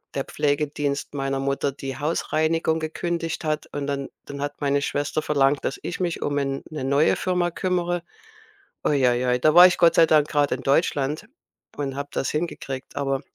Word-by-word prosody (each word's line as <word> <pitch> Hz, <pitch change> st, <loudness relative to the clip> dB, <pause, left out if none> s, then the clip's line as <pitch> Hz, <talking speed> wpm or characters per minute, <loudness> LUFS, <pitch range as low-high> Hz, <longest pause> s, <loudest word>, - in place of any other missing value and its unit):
der 135 Hz, -, 0 dB
Pflegedienst 145 Hz, -1 st, -1 dB
meiner 135 Hz, -1 st, -2 dB
Mutter 140 Hz, +1 st, 0 dB
die 135 Hz, 0 st, -7 dB
Hausreinigung 160 Hz, +1 st, 0 dB
gekündigt 165 Hz, +1 st, -3 dB
hat. 155 Hz, -1 st, -2 dB
Und 145 Hz, -1 st, -3 dB
dann 140 Hz, -1 st, -3 dB, 0.2 s
dann 140 Hz, 0 st, -7 dB
hat 145 Hz, +1 st, -4 dB
meine 140 Hz, 0 st, +1 dB
Schwester 145 Hz, +2 st, -1 dB
verlangt, 140 Hz, -2 st, +2 dB
dass 135 Hz, -, -2 dB
ich 175 Hz, -, -4 dB
mich 175 Hz, -2 st, -2 dB
um 145 Hz, 0 st, 0 dB
en 135 Hz, -1 st, -2 dB
'ne 150 Hz, -4 st, -4 dB
neue 140 Hz, +3 st, +3 dB
Firma 180 Hz, -1 st, 0 dB
kümmere. 175 Hz, -1 st, -1 dB, 0.8 s
Uiuiui, 125 Hz, -3 st, +2 dB
da 155 Hz, +4 st, +4 dB
war 180 Hz, +2 st, +10 dB
ich 180 Hz, -, 0 dB
Gott 170 Hz, -1 st, +5 dB
sei 165 Hz, 0 st, +6 dB
Dank 155 Hz, -2 st, +4 dB
grad 145 Hz, -2 st, +1 dB
in 130 Hz, -, -1 dB
Deutschland 145 Hz, +4 st, +1 dB, 0.5 s
und 135 Hz, -2 st, -3 dB
habe 140 Hz, +1 st, -5 dB
das -, -, -1 dB
hingekriegt, 150 Hz, -4 st, -4 dB
aber 135 Hz, -1 st, -1 dB
145 Hz, 175 wpm, -24 LUFS, 140-160 Hz, 0.8 s, war